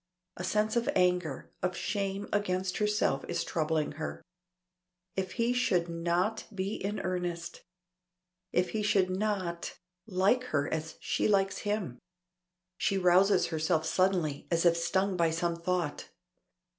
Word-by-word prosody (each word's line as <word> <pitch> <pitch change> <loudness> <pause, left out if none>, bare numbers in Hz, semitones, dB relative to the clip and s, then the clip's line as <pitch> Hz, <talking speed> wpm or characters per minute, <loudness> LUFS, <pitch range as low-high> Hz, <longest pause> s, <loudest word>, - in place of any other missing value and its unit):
A 180 - -6
sense 215 +4 +1
of 235 0 +1
anger, 180 -6 +1
of 180 0 -1
shame 200 0 -2
against 185 -2 0
herself 210 -10 +1
is - - -1
troubling 155 -1 0
her. 155 - -5 0.9
If 190 -1 -2
he 235 0 +1
should 180 -9 +1
not 175 +6 0
be 195 0 -2
in 205 0 -3
earnest! 175 -2 -3 0.9
If 180 0 +1
he 220 - -1
should 200 -3 +2
not 185 -3 -2 0.3
like 200 +6 +2
her 145 - 0
as 160 0 -3
she - - +1
likes 195 -2 +2
him! 205 - -2 0.8
She 195 - +1
rouses 185 +1 +4
herself 160 0 +1
suddenly 180 -6 +1
as 170 0 +1
if 170 -1 +6
stung 185 +3 +1
by 170 -1 +3
some 170 +1 0
thought. 170 -2 -2
185 Hz, 135 wpm, -30 LUFS, 170-200 Hz, 0.9 s, if